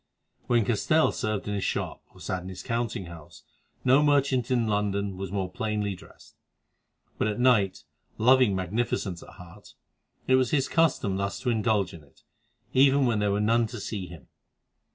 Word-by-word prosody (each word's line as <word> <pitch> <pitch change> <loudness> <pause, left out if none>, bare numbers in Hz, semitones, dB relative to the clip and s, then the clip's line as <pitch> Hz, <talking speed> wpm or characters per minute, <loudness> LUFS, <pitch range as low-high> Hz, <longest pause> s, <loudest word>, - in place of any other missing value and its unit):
When 120 -3 +2
Castell 155 +8 +2
served 110 -2 -3
in 105 - -2
his 100 -2 -2
shop - - -3
or - - -19
sat 90 - -3
in 90 - -8
his 95 -1 -8
counting 115 -3 -2
house 85 -3 -12 0.4
no 130 +3 +5
merchant 140 -4 +2
in 120 -3 +2
London 100 -2 -1
was 95 -1 -6
more 95 -2 -1
plainly 105 -1 -2
dressed; 90 - -16 0.8
but - - +1
at 105 +2 -2
night, 115 -7 +2 0.3
loving 125 -3 +4
magnificence 95 -1 -2
at - - -13
heart, 85 -1 -15 0.5
it 130 - +4
was 130 -2 +1
his 140 -3 +1
custom 155 - +1
thus 100 0 -3
to 125 - 0
indulge 110 -4 0
in 80 -3 -11
it, 70 - -25 0.5
even 135 +1 +5
when 115 -4 +1
there 105 -1 +1
were 100 - 0
none 115 +2 +2
to 120 +1 -8
see 100 -2 -5
him. 85 -4 -13
105 Hz, 175 wpm, -27 LUFS, 95-125 Hz, 0.8 s, no